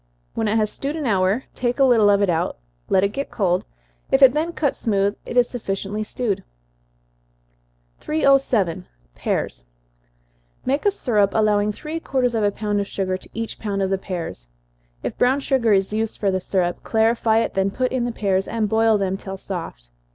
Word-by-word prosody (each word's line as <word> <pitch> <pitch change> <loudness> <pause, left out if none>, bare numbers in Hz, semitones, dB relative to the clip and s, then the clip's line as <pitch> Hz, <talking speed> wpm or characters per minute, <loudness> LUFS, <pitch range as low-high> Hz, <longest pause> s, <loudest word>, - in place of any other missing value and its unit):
When 225 - -1
it 210 - +1
has 215 -1 +1
stewed 280 +2 -4
an 310 -3 -3
hour, 195 +2 +2
take 245 -1 -1
a 275 - +4
little 230 -5 +5
of 200 0 +4
it 200 - +2
out, 165 - -1 0.3
let 190 - +3
it 200 - +3
get 275 +7 -4
cold 185 -4 0 0.5
if 270 +1 +5
it 255 -2 +8
then 320 +3 0
cuts 295 -5 -1
smooth, 200 -2 +1
it 245 - -3
is 245 -1 +5
sufficiently 205 -2 -3
stewed. 215 -2 -2 1.6
307. 260 - +2 0.3
Pears. - - -3 1.0
Make 280 +9 +1
a - - +5
syrup, 210 - +1
allowing 210 -1 +3
three 310 +9 -5
quarters 255 -6 0
of 225 -2 0
a 205 - +4
pound 205 0 -2
of 200 - -4
sugar 185 -2 -2
to 185 - -10
each 225 0 -4
pound 200 -2 -2
of 190 - -1
the 195 - +1
pears. 170 - -6 0.6
If - - -4
brown 255 +3 +3
sugar 260 -5 +1
is 195 0 +2
used 220 0 -1
for 200 -2 +1
the 185 - 0
syrup, 180 -1 -1
clarify 225 0 +2
it, 225 - 0
then 195 0 +1
put 255 +5 -1
in 255 -2 0
the 240 - -1
pears, 195 -4 0
and 225 -2 -1
boil 220 +1 +3
them 190 -1 -1
till 195 0 -7
soft. 165 - -7
215 Hz, 190 wpm, -22 LUFS, 195-245 Hz, 1.6 s, it